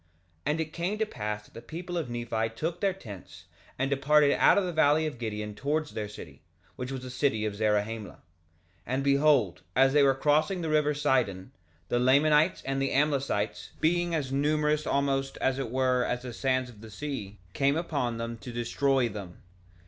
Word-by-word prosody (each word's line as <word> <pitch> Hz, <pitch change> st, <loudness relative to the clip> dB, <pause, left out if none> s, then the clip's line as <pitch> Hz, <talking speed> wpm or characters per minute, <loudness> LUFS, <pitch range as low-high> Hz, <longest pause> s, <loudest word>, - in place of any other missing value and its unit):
2:26 80 Hz, -, -37 dB, 0.4 s
And 150 Hz, +2 st, +1 dB
it 155 Hz, -1 st, -5 dB
came 180 Hz, +5 st, -2 dB
to 220 Hz, -, +1 dB
pass 105 Hz, -, -5 dB
that -, -, -22 dB
the 115 Hz, -, -9 dB
people 170 Hz, +8 st, -7 dB
of 165 Hz, -7 st, -2 dB
Nephi 120 Hz, -2 st, -2 dB
took 165 Hz, +7 st, -3 dB
their 200 Hz, -1 st, +3 dB
tents, 100 Hz, -, -11 dB, 0.3 s
and 135 Hz, -, 0 dB
departed 140 Hz, +1 st, +4 dB
out -, -, +5 dB
of 200 Hz, -, +3 dB
the 180 Hz, -1 st, -3 dB
valley 155 Hz, 0 st, +4 dB
of 145 Hz, -6 st, -5 dB
Gideon 105 Hz, -2 st, -4 dB
towards 145 Hz, +7 st, -2 dB
their 105 Hz, -2 st, -4 dB
city, 75 Hz, -9 st, -11 dB, 0.3 s
which 125 Hz, +1 st, -5 dB
was 130 Hz, -1 st, -5 dB
the 130 Hz, -, -7 dB
city 125 Hz, -5 st, 0 dB
of 105 Hz, -1 st, -2 dB
Zarahemla. 105 Hz, 0 st, -1 dB
2:27 -, -, -25 dB, 0.7 s
And 130 Hz, +2 st, -1 dB
behold, 140 Hz, -, +3 dB
as 135 Hz, +2 st, +5 dB
they 145 Hz, -, +5 dB
were 135 Hz, -1 st, +4 dB
crossing 155 Hz, +6 st, +2 dB
the 160 Hz, -, -2 dB
river 150 Hz, -1 st, +2 dB
Sidon, 130 Hz, -8 st, 0 dB, 0.4 s
the 120 Hz, -, +1 dB
Lamanites 150 Hz, +6 st, +4 dB
and 135 Hz, 0 st, -2 dB
the 135 Hz, -, +1 dB
Amlicites, 130 Hz, -10 st, 0 dB
being 175 Hz, +1 st, +1 dB
as 140 Hz, -4 st, -2 dB
numerous 150 Hz, +2 st, +1 dB
almost, 135 Hz, -1 st, 0 dB
as 130 Hz, 0 st, 0 dB
it 135 Hz, -4 st, -3 dB
were, 130 Hz, 0 st, +2 dB
as 125 Hz, 0 st, -2 dB
the 125 Hz, -2 st, -6 dB
sands 130 Hz, 0 st, 0 dB
of 105 Hz, -3 st, -17 dB
the 110 Hz, -, -10 dB
sea, 110 Hz, -5 st, -6 dB, 0.2 s
came 140 Hz, +2 st, +2 dB
upon 140 Hz, -8 st, -2 dB
them 115 Hz, 0 st, -5 dB
to 125 Hz, -, -8 dB
destroy 125 Hz, +2 st, +1 dB
them. 100 Hz, -5 st, -9 dB
135 Hz, 195 wpm, -28 LUFS, 115-150 Hz, 0.7 s, out